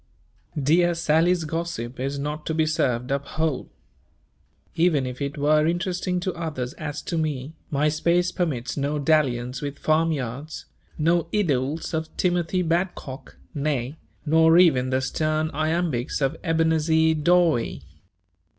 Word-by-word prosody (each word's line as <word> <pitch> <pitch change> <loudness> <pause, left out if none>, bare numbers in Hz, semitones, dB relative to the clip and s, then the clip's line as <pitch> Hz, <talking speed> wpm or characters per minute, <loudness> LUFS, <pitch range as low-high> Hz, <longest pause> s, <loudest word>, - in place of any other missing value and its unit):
Dear 170 +5 +3
Sally's 170 +2 +2
gossip 155 -7 -4
is 135 +2 -2
not 150 +2 -4
to 160 - -1
be 160 0 +2
served 125 -5 0
up 140 0 0
whole. 155 -4 -2 1.0
Even 160 -5 +2
if 125 +2 -6
it 140 +1 -3
were 150 +2 +3
interesting 180 +1 -1
to 185 0 -2
others 150 -7 -4
as 150 -2 -6
to 170 - -2
me, 150 -2 -3 0.2
my 145 +1 +1
space 170 +4 +1
permits 140 -9 -2
no 145 +1 -1
dalliance 130 -5 +1
with 145 -1 -5
farm 160 +2 +2
yards, 140 +2 -5 0.3
no 165 +1 +2
idyls 155 -6 -1
of 160 0 -2
Timothy 180 0 +1
Badcock, 165 -5 -3 0.2
nay, 140 -2 -2 0.3
nor 160 +2 +5
even 135 -8 +4
the 130 0 +1
stern 155 +3 -1
iambics 155 -4 -1
of 135 +2 0
Ebenezer 160 -1 +2
Dawe. 160 -5 +3
155 Hz, 135 wpm, -24 LUFS, 140-165 Hz, 1.0 s, nor